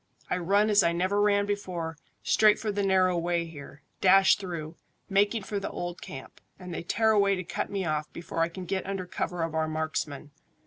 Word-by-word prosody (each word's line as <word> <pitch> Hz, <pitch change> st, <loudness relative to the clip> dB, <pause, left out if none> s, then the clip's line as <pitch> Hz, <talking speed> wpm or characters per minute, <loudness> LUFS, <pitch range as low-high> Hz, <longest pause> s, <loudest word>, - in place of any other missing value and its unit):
I -, -, +2 dB
run 200 Hz, +5 st, +2 dB
as 205 Hz, -1 st, +6 dB
I 170 Hz, -2 st, +2 dB
never 185 Hz, +4 st, +1 dB
ran 205 Hz, -1 st, +3 dB
before, 180 Hz, -5 st, -3 dB, 0.3 s
straight 215 Hz, -1 st, +5 dB
for 215 Hz, -, -2 dB
the 205 Hz, 0 st, -1 dB
narrow 190 Hz, -2 st, +3 dB
way 170 Hz, 0 st, 0 dB
here, 145 Hz, -3 st, -11 dB, 0.2 s
dash 195 Hz, +1 st, +6 dB
through, 170 Hz, -4 st, -6 dB, 0.3 s
making 205 Hz, +2 st, +2 dB
for 205 Hz, +1 st, -3 dB
the 195 Hz, -, -4 dB
old 175 Hz, 0 st, -5 dB
camp, 135 Hz, -1 st, -10 dB, 0.2 s
and 180 Hz, -2 st, -8 dB
they -, -, -4 dB
tear 220 Hz, +6 st, +2 dB
away 200 Hz, -2 st, +3 dB
to 185 Hz, -, -4 dB
cut -, -, -3 dB
me 195 Hz, -2 st, -2 dB
off 155 Hz, -1 st, -2 dB
before 170 Hz, -1 st, -6 dB
I 165 Hz, 0 st, +2 dB
can 180 Hz, +2 st, -8 dB
get 190 Hz, +1 st, -2 dB
under 195 Hz, -2 st, -3 dB
cover 180 Hz, -1 st, -3 dB
of 165 Hz, -1 st, -3 dB
our 160 Hz, 0 st, 0 dB
marksmen. 155 Hz, -2 st, -3 dB
185 Hz, 210 wpm, -28 LUFS, 165-200 Hz, 0.3 s, as